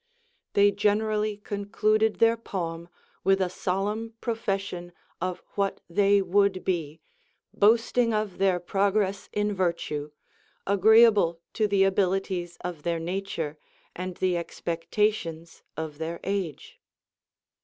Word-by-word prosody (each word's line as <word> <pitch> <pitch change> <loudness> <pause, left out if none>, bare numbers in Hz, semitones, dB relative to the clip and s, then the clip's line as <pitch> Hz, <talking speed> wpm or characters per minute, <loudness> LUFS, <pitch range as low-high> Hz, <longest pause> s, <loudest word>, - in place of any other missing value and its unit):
They 205 0 +5
generally 210 +1 +1
concluded 215 +1 0
their 230 0 +4
poem 170 -6 -5 0.3
Avith 195 0 +3
a 185 -2 0
solemn 210 +5 -2
profession 195 -6 -3 0.3
of 185 0 -3
what 200 -1 -1
they 200 +2 +3
would 190 0 +2
be, 165 -4 -2 0.5
boasting 230 +2 +3
of 215 -4 -2
their 190 -2 +3
progress 195 +2 0
in 210 0 0
virtue, 170 -5 -2 0.6
agreeable 205 -3 +5
to 215 - +1
the 200 -1 +3
abilities 190 -2 0
of 175 -4 -5
their 170 +1 -1
nature 165 -3 -4 0.4
and 185 0 -5
the 185 -2 +1
expectations 170 0 -2 0.2
of 155 -2 -5
their 165 +1 -4
age. 190 -6 -4
195 Hz, 110 wpm, -27 LUFS, 175-210 Hz, 0.6 s, They